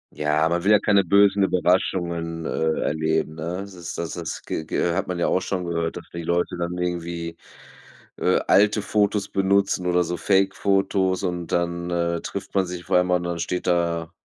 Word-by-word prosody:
Ja, 75 Hz, +1 st, +1 dB
man 85 Hz, +1 st, -1 dB
will 100 Hz, -, +2 dB
ja 105 Hz, -, +8 dB
keine 100 Hz, -2 st, +3 dB
bösen 100 Hz, +2 st, +4 dB
Überraschungen, 85 Hz, -2 st, 0 dB
äh, 80 Hz, -1 st, 0 dB
erleben, 80 Hz, 0 st, 0 dB
ne? 80 Hz, +3 st, -4 dB
Das 100 Hz, -1 st, -9 dB
ist 85 Hz, -2 st, -7 dB
das 85 Hz, -1 st, -3 dB
das 85 Hz, -2 st, -5 dB
g -, -, -4 dB
g 85 Hz, +2 st, 0 dB
hat 95 Hz, -, -1 dB
man 90 Hz, -1 st, -3 dB
ja 85 Hz, -, +1 dB
auch 95 Hz, -, +1 dB
schon 90 Hz, -2 st, -3 dB
gehört, 85 Hz, -1 st, -2 dB
dass 85 Hz, -, -10 dB
die 85 Hz, -, -4 dB
Leute 85 Hz, +2 st, 0 dB
dann 85 Hz, +1 st, -3 dB
irgendwie, 85 Hz, -1 st, -3 dB, 0.8 s
äh, -, -, +2 dB
alte 105 Hz, +1 st, +4 dB
Fotos 105 Hz, -1 st, +1 dB
benutzen 95 Hz, -1 st, +1 dB
oder 90 Hz, 0 st, +3 dB
so 90 Hz, +1 st, -3 dB
Fake-Fotos 95 Hz, +1 st, +1 dB
und 90 Hz, -2 st, -2 dB
dann, 85 Hz, 0 st, -1 dB
äh, 85 Hz, -1 st, -1 dB
trifft 100 Hz, 0 st, -6 dB
man 95 Hz, -2 st, +1 dB
sich 90 Hz, -1 st, -6 dB
vor -, -, +2 dB
allem 90 Hz, 0 st, +2 dB
und 90 Hz, -1 st, +2 dB
dann 85 Hz, -1 st, -3 dB
steht 90 Hz, +2 st, -3 dB
da, 85 Hz, -1 st, 0 dB
90 Hz, 195 wpm, -23 LUFS, 85-95 Hz, 0.8 s, ja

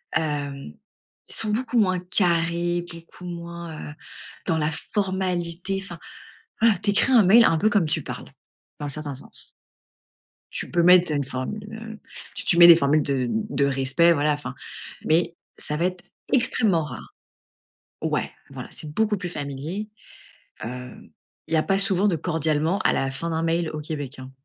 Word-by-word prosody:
hem, 145 Hz, -, -2 dB, 0.6 s
ils -, -, 0 dB
sont 215 Hz, -1 st, +3 dB
beaucoup 240 Hz, +1 st, 0 dB
moins 185 Hz, -3 st, +2 dB
carrés, 175 Hz, -1 st, +1 dB
beaucoup 170 Hz, +2 st, -12 dB
moins, 170 Hz, -3 st, -7 dB
heu, -, -, -10 dB, 0.5 s
dans 165 Hz, -, +2 dB
la 150 Hz, 0 st, +1 dB
formalité, 185 Hz, 0 st, -2 dB
enfin, 175 Hz, -3 st, -8 dB, 0.6 s
voilà, 225 Hz, -4 st, +5 dB
tu 205 Hz, -, -1 dB
écris 225 Hz, +6 st, +2 dB
un 230 Hz, -5 st, +7 dB
mail 225 Hz, +5 st, +7 dB
un 165 Hz, -, +3 dB
peu 210 Hz, +6 st, +3 dB
comme 205 Hz, -7 st, +2 dB
tu -, -, 0 dB
parles, -, -, -7 dB, 0.5 s
dans 145 Hz, -, -4 dB
un -, -, -4 dB
certain 145 Hz, 0 st, -3 dB
sens. 135 Hz, -, -9 dB, 1.0 s
Tu -, -, -2 dB
peux 175 Hz, -1 st, +2 dB
mettre 180 Hz, -2 st, +6 dB
une 145 Hz, -2 st, 0 dB
formule, 135 Hz, +12 st, -4 dB
heu, 220 Hz, -1 st, -8 dB, 0.4 s
tu -, -, -2 dB
tu 170 Hz, -, +3 dB
mets 170 Hz, -, +11 dB
les 170 Hz, -1 st, +10 dB
formules 150 Hz, 0 st, +3 dB
de 135 Hz, -3 st, 0 dB
de 210 Hz, -11 st, 0 dB
respect, 140 Hz, +5 st, +3 dB
voilà, 150 Hz, -1 st, +2 dB
enfin, 145 Hz, 0 st, -5 dB, 0.5 s
mais 170 Hz, +2 st, +2 dB, 0.2 s
ça 150 Hz, -, -3 dB
va 170 Hz, -, 0 dB
être 185 Hz, -1 st, -5 dB, 0.3 s
extrêmement 220 Hz, -9 st, +3 dB
rare. 135 Hz, -6 st, -9 dB, 0.9 s
Ouais, -, -, -1 dB, 0.2 s
voilà, -, -, -8 dB
c'est 150 Hz, -, -7 dB
beaucoup 215 Hz, +1 st, +1 dB
plus 180 Hz, -1 st, -5 dB
familier, 150 Hz, +8 st, -5 dB, 0.8 s
heu, 125 Hz, +1 st, -6 dB, 0.6 s
il 165 Hz, -, -1 dB
y -, -, +5 dB
a 155 Hz, -, +3 dB
pas 195 Hz, 0 st, +1 dB
souvent 200 Hz, 0 st, +3 dB
de 175 Hz, -, +1 dB
«cordialement» 160 Hz, +1 st, 0 dB
à -, -, +4 dB
la 135 Hz, -1 st, 0 dB
fin 165 Hz, +5 st, -4 dB
d'un 160 Hz, 0 st, -1 dB
mail 165 Hz, 0 st, 0 dB
au 155 Hz, -, -5 dB
Québec, 145 Hz, -3 st, -5 dB
hein. 130 Hz, 0 st, -9 dB
170 Hz, 175 wpm, -24 LUFS, 150-190 Hz, 1.0 s, mets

